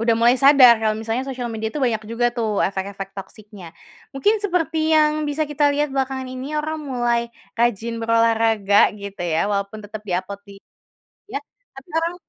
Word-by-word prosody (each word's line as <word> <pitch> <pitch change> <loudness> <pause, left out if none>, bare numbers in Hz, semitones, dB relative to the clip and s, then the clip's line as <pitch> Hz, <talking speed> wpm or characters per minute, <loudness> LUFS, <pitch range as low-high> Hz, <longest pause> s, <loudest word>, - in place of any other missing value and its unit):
udah 230 0 +2
mulai 240 +2 +4
sadar, 270 -3 +7
kalau 220 -1 +1
misalnya 225 +4 -3
sosial 255 -3 -5
media 220 0 -4
itu 300 - -4
banyak 230 -5 0
juga 230 +2 0
tuh 220 -4 -1
efek-efek 195 0 -3
toksiknya. 195 -3 -11 0.4
Mungkin 410 +12 +2
seperti 325 -4 0
yang 305 0 +2
bisa 300 +2 -1
kita 290 -1 +2
lihat 295 +1 0
belakangan 265 -1 -2
ini, 255 +3 -6
orang 310 +1 -3
mulai 240 -3 -1 0.2
rajin 235 0 0
berolahraga 225 -3 +3
gitu 200 -2 -7
ya 165 +4 0
walaupun 200 +1 -3
tetap 215 +1 -8
di 190 - -5
upload 195 +2 -6
di 200 - -11 0.7
ya? 415 0 -4 0.4
Tapi - - -12
orang 335 +1 -1
235 Hz, 170 wpm, -21 LUFS, 210-275 Hz, 0.7 s, sadar